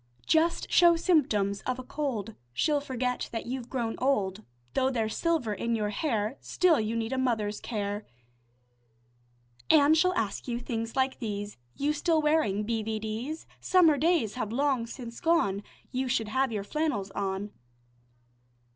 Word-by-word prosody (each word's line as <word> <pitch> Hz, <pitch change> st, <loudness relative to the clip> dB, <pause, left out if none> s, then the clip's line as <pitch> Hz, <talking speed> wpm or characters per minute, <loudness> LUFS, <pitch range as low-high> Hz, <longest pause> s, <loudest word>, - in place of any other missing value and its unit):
Just 325 Hz, +1 st, +2 dB
show 345 Hz, -1 st, +7 dB
symptoms 210 Hz, -, +2 dB
of 255 Hz, -1 st, 0 dB
a 255 Hz, -, -6 dB
cold, 245 Hz, -7 st, -3 dB, 0.2 s
She'll 295 Hz, -, +1 dB
forget 250 Hz, -2 st, -2 dB
that 225 Hz, -, -4 dB
you've 250 Hz, 0 st, -5 dB
grown 235 Hz, -4 st, -1 dB
old. 215 Hz, -6 st, 0 dB, 0.3 s
Though 265 Hz, 0 st, +2 dB
there's 225 Hz, -4 st, -1 dB
silver 320 Hz, -11 st, 0 dB
in 230 Hz, +4 st, -1 dB
your 210 Hz, -2 st, -1 dB
hair, 220 Hz, -1 st, -1 dB
Still 355 Hz, -4 st, +3 dB
you 220 Hz, +1 st, -1 dB
need 230 Hz, +2 st, -2 dB
a 260 Hz, -, 0 dB
mother's 215 Hz, -5 st, 0 dB
care, 205 Hz, -2 st, -3 dB, 1.6 s
An' 300 Hz, -1 st, +6 dB
she'll 365 Hz, +4 st, +4 dB
ask 225 Hz, -, -2 dB
you 240 Hz, -1 st, -1 dB
things 230 Hz, -2 st, -4 dB
like 265 Hz, 0 st, +1 dB
these: 205 Hz, -3 st, -4 dB, 0.2 s
"You 290 Hz, +2 st, 0 dB
still 320 Hz, +2 st, +2 dB
wearing 300 Hz, -10 st, +2 dB
b. 225 Hz, +1 st, -1 dB
v. 220 Hz, 0 st, -2 dB
d.'s? 225 Hz, +9 st, -4 dB
Summer 345 Hz, -5 st, +5 dB
days 315 Hz, -, +2 dB
have 220 Hz, -4 st, -3 dB
long 260 Hz, -2 st, +1 dB
since 235 Hz, -1 st, -8 dB
gone, 325 Hz, -, +2 dB, 0.3 s
You 260 Hz, 0 st, -1 dB
should 230 Hz, -4 st, 0 dB
have 260 Hz, +2 st, +1 dB
your 210 Hz, -3 st, -2 dB
flannels 220 Hz, -6 st, -2 dB
on." 195 Hz, +1 st, -3 dB
240 Hz, 155 wpm, -29 LUFS, 215-290 Hz, 1.6 s, show